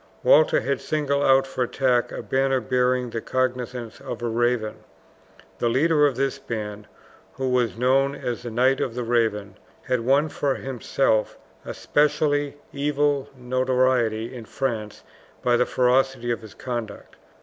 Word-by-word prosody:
Walter - - +5
had - - -2
singled 140 -2 0
out 135 0 +5
for 130 -1 -2
attack 125 -1 +1
a - - -6
banner 135 0 +1
bearing 125 +1 0
the 115 - -3
cognizance 125 -2 -3
of - - -6
a - - 0
raven. 115 -1 0 0.8
The 120 - +1
leader 150 +4 +3
of 135 - -2
this 135 +1 -1
band, 105 -2 -6 0.5
who 130 - -3
was 125 -3 +1
known 135 +3 +2
as 120 -4 -4
the 120 - -6
Knight 130 +4 +2
of 120 - -2
the 125 - -2
Raven, 110 -4 0 0.2
had 125 -1 0
won 135 +6 +2
for 140 -2 -1
himself 130 -3 -1 0.3
a - - -7
specially 145 -1 +1 0.2
evil 145 -1 0
notoriety 125 -2 +1
in 120 -3 -8
France 110 -6 -4 0.4
by 120 -1 +3
the 125 +1 +2
ferocity 125 -1 +1
of 115 - -2
his 110 -3 -12
conduct. 120 -5 -6
125 Hz, 150 wpm, -24 LUFS, 120-135 Hz, 0.8 s, Walter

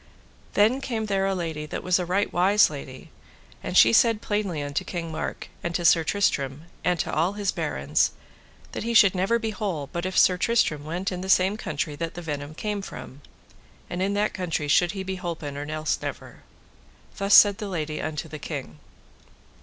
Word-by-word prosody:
Then 225 +6 +3
came 225 -5 -3
there 195 -2 0
a 195 - 0
lady 160 -4 -4
that - - -5
was 185 0 +2
a 180 - -3
right 195 +3 0
wise 190 +1 +4
lady, 135 -3 -9 0.5
and - - -2
she 115 +1 +7
said 225 - +4
plainly 200 -9 -2
unto 145 0 -2
King 170 -2 -5
Mark, 155 - -5
and 170 0 -3
to 175 - -1
Sir 165 0 +5
Tristram, 150 -6 0 0.2
and 175 0 +1
to - - -4
all 170 +5 +1
his 205 -1 -1
barons, - - 0 0.6
that - - -5
he 235 +1 -2
should 200 -4 +7
never 195 +5 +1
be 225 -1 -3
whole 180 - -4
but 170 +1 -2
if 185 - -4
Sir 180 - +5
Tristram 180 -9 +1
went 175 +5 -3
in 180 -1 -4
the 190 - -6
same 190 +2 +4
country 150 -6 -3
that 165 0 -4
the 175 - -6
venom 145 -1 -5
came 210 +2 -3
from, 130 -5 -9 0.7
and 175 +1 -3
in 200 +2 0
that 210 +1 0
country 165 -5 -2
should 175 +5 +3
he 195 -1 -4
be 190 0 -4
holpen 160 -5 -5
or 145 +1 -5
else 155 0 -1
never. - - -7 0.8
Thus 200 0 +4
said 205 0 +7
the 210 - -4
lady 155 -4 -3
unto 155 +1 -4
the 155 -1 -8
king. 135 - -6
180 Hz, 200 wpm, -25 LUFS, 155-200 Hz, 0.8 s, she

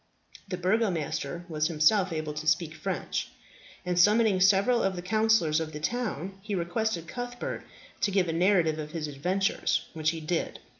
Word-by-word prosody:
The 180 -1 -3
Burgomaster 175 -5 -1
was 155 -2 0
himself 170 +4 +3
able 155 -2 -3
to 150 +1 -6
speak 160 0 +2
French, - - -3 0.6
and 180 -1 0
summoning 210 +1 +5
several 200 +6 +4
of 195 -1 0
the 175 - -4
councillors 215 -6 +3
of 160 -1 -4
the 150 - -5
town, 195 - -3
he 205 0 -3
requested 175 0 -1
Cuthbert 245 +4 -5 0.4
to - - +1
give 190 -2 +2
a 165 - -1
narrative 170 -3 +3
of 150 0 -6
his 160 -2 -3
adventures; 180 +8 0
which 155 -1 0
he 165 0 -3
did. 160 +2 -2
180 Hz, 165 wpm, -28 LUFS, 155-205 Hz, 0.6 s, summoning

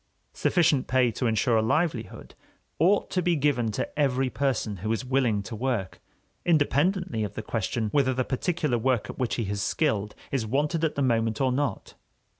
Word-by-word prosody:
Sufficient 160 -7 +2
pay 125 -2 +3
to 120 +2 -1
ensure 115 +1 +2
a - - +3
livelihood 120 0 -1 0.5
ought 190 +6 +3
to 185 - +1
be 175 -1 +2
given 135 -6 +1
to 145 - -4
every 135 -2 +1
person 130 -7 -1
who 110 +5 -3
is 115 +3 -2
willing 125 -6 +1
to 110 - -7
work, 115 -5 -2 0.4
independently 165 - +1
of 105 -1 -5
the 110 - -5
question 110 +1 -2
whether 135 -3 +3
the 130 - +1
particular 150 -2 -1
work 125 -1 0
at - - -14
which 125 -3 0
he 115 -4 -2
is 100 0 -2
skilled 105 -4 0 0.2
is 135 -4 0
wanted 150 +8 0
at 160 - 0
the 140 - 0
moment 115 -3 +1
or 130 -1 +2
not. 140 +2 -2
130 Hz, 185 wpm, -26 LUFS, 110-145 Hz, 0.5 s, pay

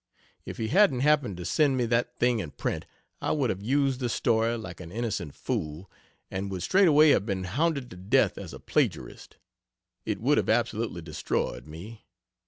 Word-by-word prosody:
If - - -6
he 110 -1 -2
hadn't 175 -10 +4
happened 140 - +2
to 90 - -6
send 140 - +2
me 125 - +1
that 120 +1 0
thing 120 -1 +2
in 85 -7 -4
print, - - -4 0.3
I - - 0
would 140 -6 +1
have 95 - -5
used 135 +3 +1
the 125 -2 -1
story 115 0 +1
(like 95 -7 -8
an 85 -2 -9
innocent 105 - -3
fool) 75 +5 -4 0.4
and 95 +1 -3
would 95 -2 -4
straightway 155 -6 +5
have 100 - +2
been 95 -3 -2
hounded 140 - -1
to 90 - -10
death 95 +3 +2
as - - -8
a - - -9
plagiarist. - - -2 0.7
It - - -3
would 140 +6 +3
have - - -2
absolutely 115 -5 0
destroyed 75 -5 -3
me. 95 +9 -10
115 Hz, 185 wpm, -27 LUFS, 95-135 Hz, 0.7 s, straightway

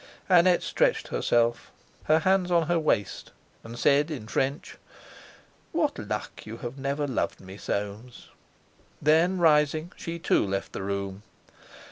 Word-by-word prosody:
Annette 180 -1 +5
stretched - - +1
herself, 120 0 +1 0.4
her 155 - +4
hands 185 +2 +2
on 170 -2 +3
her 170 +1 +1
waist, 115 -10 -1 0.3
and 115 +1 -9
said 145 +5 +3
in 130 -9 -6
French: 135 +5 -2 0.9
"What - - 0
luck - - -5
that - - -12
you 110 +2 -7
have 120 +2 -6
never 140 +2 -1
loved 130 -4 -2
me, 95 0 -11
Soames!" 105 +5 -5 0.7
Then 165 +5 +3
rising, 155 0 +3
she 170 0 -6
too 165 - +2
left 100 -1 -3
the - - -4
room. 100 0 -4
140 Hz, 140 wpm, -27 LUFS, 110-165 Hz, 0.9 s, Annette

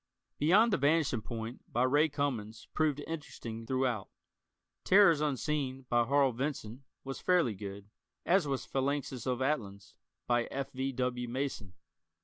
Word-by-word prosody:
"Beyond 200 +9 +5
the - - +4
Vanishing 145 -4 +2
Point," 115 +2 -6
by 120 - +2
Ray 145 +5 +4
Cummings, 125 -7 -3
proved 150 -2 +1
interesting 115 -8 -6
through 130 +1 +1
out. 115 -6 -2 0.7
"Terrors 185 -6 +6
Unseen," 135 -2 -1
by 120 -1 +3
Harl 140 +1 +3
Vincent, 125 -2 -4 0.2
was 135 0 -6
fairly 175 -11 +3
good, 100 0 -8 0.4
as 180 -3 +3
was 135 -2 -2
"Phalanxes 135 -2 -2
of 130 0 0
Atlans," 105 -9 -2 0.3
by 120 -1 +2
F. 135 0 -4
V. 135 +1 -2
W. 125 -1 -2
Mason. 120 -7 -4
130 Hz, 140 wpm, -32 LUFS, 120-145 Hz, 0.7 s, Terrors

